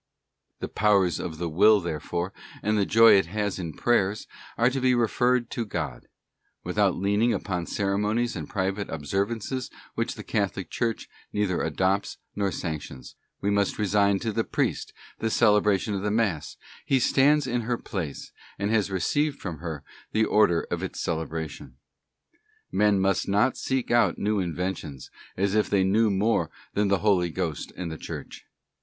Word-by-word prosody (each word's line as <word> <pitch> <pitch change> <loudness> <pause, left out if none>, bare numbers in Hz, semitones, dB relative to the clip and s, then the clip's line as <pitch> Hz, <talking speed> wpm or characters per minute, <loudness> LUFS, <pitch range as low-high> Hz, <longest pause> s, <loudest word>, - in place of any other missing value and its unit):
f - - -43
The - - -2
powers 100 -4 +2
of 80 -3 -5
the 85 +1 -2
will, 100 +7 +5
therefore, 85 +2 -3 0.3
and 105 +1 +1
the 100 -2 +1
joy 115 +1 +7
it 80 - -2
has 105 +1 -2
in 85 -3 -4
prayers, 105 -4 +1 0.3
are 120 - +4
to 135 0 -2
be 130 -1 +4
referred 120 +1 +1
to 120 - -2
God: 105 - -5 0.6
without - - +1
leaning 105 +5 +2
upon 90 -4 -3
ceremonies 105 +4 0
and 80 -5 -6
private 100 +1 -2
observances 100 - -2 0.2
which - - -2
the - - -8
Catholic - - -2
Church 115 -1 -2 0.2
neither 105 -4 0
adopts 95 +5 0 0.2
nor 100 -1 0
sanctions; 75 -7 -6 0.3
we 100 - +1
must 100 -1 +1
resign 100 -1 +2
to 115 - -1
the 115 +2 0
priest - - -1 0.3
the 115 - 0
celebration 105 -2 +3
of 100 +1 -1
Mass, 105 -8 -1 0.3
he 135 - +2
stands 145 +4 +4
in 120 -1 -1
her 120 +1 -1
place, 85 -11 -5 0.3
and 100 +1 -1
has 105 -3 +2
received 140 - 0
from 85 -6 -6
her 80 -4 -5 0.3
the 110 0 +3
order 105 -7 +3
of - - -1
its - - -5
celebration. 80 -4 -4 1.0
Men 105 -2 +3
must 95 -1 +1
not 105 +6 +2
seek 130 -2 -2
out 120 0 +3
new 105 0 0
inventions, 85 -5 -4 0.3
as 100 +1 +1
if 110 0 +2
they 100 -2 +3
knew 105 +4 +3
more 105 +3 +1 0.2
than 105 0 +1
the 100 0 +3
Holy 90 -4 +3
Ghost 85 -3 -3
and 85 -3 -4
the 80 - -7
Church. - - -8
100 Hz, 165 wpm, -26 LUFS, 90-110 Hz, 1.0 s, joy